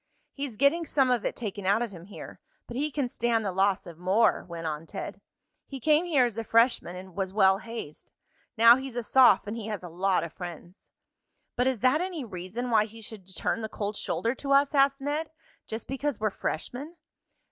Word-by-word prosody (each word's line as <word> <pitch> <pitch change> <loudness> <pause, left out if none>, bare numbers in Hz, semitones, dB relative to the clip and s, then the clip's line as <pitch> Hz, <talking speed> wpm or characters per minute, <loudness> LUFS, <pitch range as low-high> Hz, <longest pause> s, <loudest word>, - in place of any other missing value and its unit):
He's 275 -6 -5
getting 285 +7 +3
some 265 -3 +2
of 240 -3 +1
it - - -1
taken 205 -4 -5
out 205 +4 +3
of 235 - -5
him 175 -3 -11
here, 200 - -10 0.3
but 240 - -9
he 295 +4 0
can 285 -3 -1
stand 235 -2 0
the 195 - 0
loss 190 +1 +1
of 170 -2 -11
more," 190 +6 +3
went 170 -2 -7
on 155 +1 -4
Ted. - - -7 0.5
"He 270 - -7
came 310 +5 +3
here 290 -8 +3
as 230 -2 -3
a - - -2
freshman 230 -5 +2
and 185 0 -10
was 190 -1 -2
well 190 -1 +4
hazed. 225 -10 -8 0.5
Now 230 +2 +8
he's 265 -2 -7
a 240 - -2
soph, 255 +2 +5
and 210 +2 -4
he 225 -2 -6
has 210 -4 -4
a 175 - -7
lot 185 +3 +1
of 170 - -7
friends." 175 +1 -10 0.7
"But 250 - +1
is 260 -5 0
that 260 +6 +3
any 355 -7 -3
reason 210 +5 -5
why 215 -2 +4
he 225 +1 -13
should 210 -3 -10
turn 230 - -1
the 220 - -4
cold 205 0 -4
shoulder 230 +3 -1
to 275 +1 -1
us?" 280 +1 +4
asked 275 0 +3
Ned. 295 +3 -2 0.4
"Just 220 +1 -5
because 270 -1 -2
we're 215 -1 0
freshmen?" 260 - -4
225 Hz, 210 wpm, -28 LUFS, 195-265 Hz, 0.7 s, Now